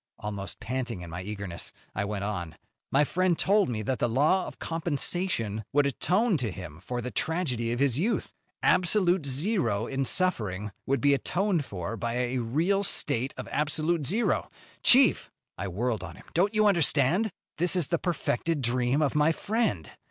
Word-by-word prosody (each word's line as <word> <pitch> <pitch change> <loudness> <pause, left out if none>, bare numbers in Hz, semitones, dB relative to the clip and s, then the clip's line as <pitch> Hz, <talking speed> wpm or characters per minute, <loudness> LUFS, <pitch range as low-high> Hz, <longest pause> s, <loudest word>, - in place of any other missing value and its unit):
Almost 100 -2 -5
panting 125 -6 -3
in 85 -2 -8
my 85 +2 -5
eagerness 100 -3 -5 0.2
I 100 - -1
went 100 -1 -3
on: 90 -6 -4 0.3
"My 140 +2 +4
friend 180 +2 +1
told 200 -4 +3
me 110 -3 -2
that 130 +4 -1
the 120 - +1
law 150 +10 +2
of - - -9
compensation 160 - -1
would 145 0 +4
atone 185 - +1
to 125 -5 -2
him 85 -5 -8
for 120 +6 -4
the 125 +1 -5
tragedy 130 -9 -1
of 120 - -1
his 135 -1 +2
youth. 210 +3 -1 0.3
Absolute 180 -2 +3
zero 135 - 0
in 135 +2 -2
suffering 105 - 0 0.2
would 135 +1 +1
be 145 0 +5
atoned 175 +2 0
for 95 +1 -5
by 115 +3 -2
a 125 +1 0
real 160 - +1
state 135 - +1
of - - -6
absolute 155 +2 0
zero. 210 - 0 0.3
Chief!" 260 +1 +5 0.3
I 95 - -4
whirled 110 +2 -2
on 85 -3 -8
him. - - -15
"Don't 195 +5 +2
you 215 0 +4
understand? 175 - +3 0.3
This 175 +2 +1
is 175 -6 0
the 170 -1 +1
perfected 165 -3 -1
dream 125 +4 +1
of 140 - +1
my 150 +1 +4
friend. 200 - -1
135 Hz, 175 wpm, -28 LUFS, 110-175 Hz, 0.3 s, be